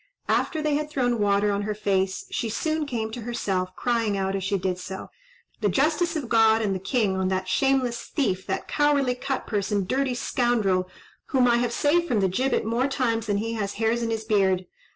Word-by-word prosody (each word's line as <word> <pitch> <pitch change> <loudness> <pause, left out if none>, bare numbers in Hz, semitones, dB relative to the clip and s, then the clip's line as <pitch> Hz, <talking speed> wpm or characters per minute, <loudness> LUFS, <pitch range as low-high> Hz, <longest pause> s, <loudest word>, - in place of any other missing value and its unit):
After 315 -2 +1
they 305 -1 +1
had 300 +1 -1
thrown 245 -5 0
water 205 0 +2
on 200 0 -1
her 210 0 -2
face, 195 -2 0
she 230 - -2
soon 310 +6 -1
came 225 -4 -3
to 240 - -6
herself, 190 -6 -2
crying 230 -4 0
out 195 0 -1
as 195 - -2
she 195 +1 0
did 185 -1 -2
so, 190 +1 -7 0.5
"The 210 - +1
justice 320 - +1
of 290 -6 -3
God 225 -1 +4
and 200 -2 0
the 190 - -2
king 200 0 0
on 190 0 0
that 185 0 -1
shameless 265 0 +1
thief, 190 - -1
that 190 - -3
cowardly 285 -3 +2
cut 265 +2 -3
purse, 205 -2 -2
and 200 -3 0
dirty 260 +1 0
scoundrel, 215 -8 +1 0.4
whom 255 -4 +3
I 235 0 +4
have 240 0 0
saved 335 +7 +2
from 235 -8 +1
the 195 - +3
gibbet 255 +8 0
more 235 +4 +1
times 230 -5 -1
than 205 -1 +1
he 225 +2 -2
has 205 -3 -2
hairs 225 +2 0
in 230 - -1
his 225 -1 -2
beard. 190 -4 +2
225 Hz, 215 wpm, -25 LUFS, 195-255 Hz, 0.5 s, God